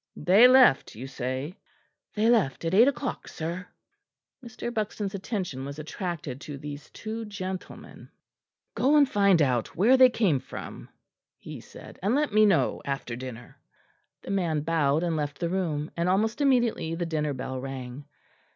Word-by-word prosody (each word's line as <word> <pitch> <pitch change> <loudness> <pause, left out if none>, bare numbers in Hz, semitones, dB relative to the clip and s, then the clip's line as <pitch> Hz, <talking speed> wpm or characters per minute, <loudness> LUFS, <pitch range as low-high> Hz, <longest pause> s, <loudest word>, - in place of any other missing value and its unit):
"They 190 +10 +6
left, 255 - +5
you 120 +5 -7
say?" 130 +5 -5 0.6
"They 215 +1 +2
left 200 - +2
at 165 - -1
eight 225 +6 +7
o'clock, 265 -2 -2
sir." 170 +3 -5 0.8
Mr. 235 0 -6
Buxton's 210 -2 -3
attention 185 - -4
was 140 +1 -7
attracted 155 -4 -5
to 145 -3 -7
these 145 +1 -8
two 220 +1 -6
gentlemen. 190 -3 -8 0.6
"Go 280 +4 +2
and 290 -2 +6
find 200 - +4
out 125 -4 -1
where 235 +9 +5
they 255 -1 +8
came 195 - +1
from," - - -9 0.5
he - - -9
said, - - -13
"and 205 +7 +1
let 295 -5 0
me 215 0 +6
know 190 -5 +1
after 135 -4 -4
dinner." 125 -1 -9 0.6
The - - -6
man 170 -6 0
bowed 155 -1 +1
and 170 -2 0
left 145 -2 -3
the 170 - -2
room, 165 -5 -2
and 170 +1 0
almost 220 +8 +1
immediately 240 - +1
the 175 +1 -2
dinner 150 -3 -1
bell 130 0 -5
rang. 135 0 -7
175 Hz, 160 wpm, -27 LUFS, 145-215 Hz, 0.8 s, they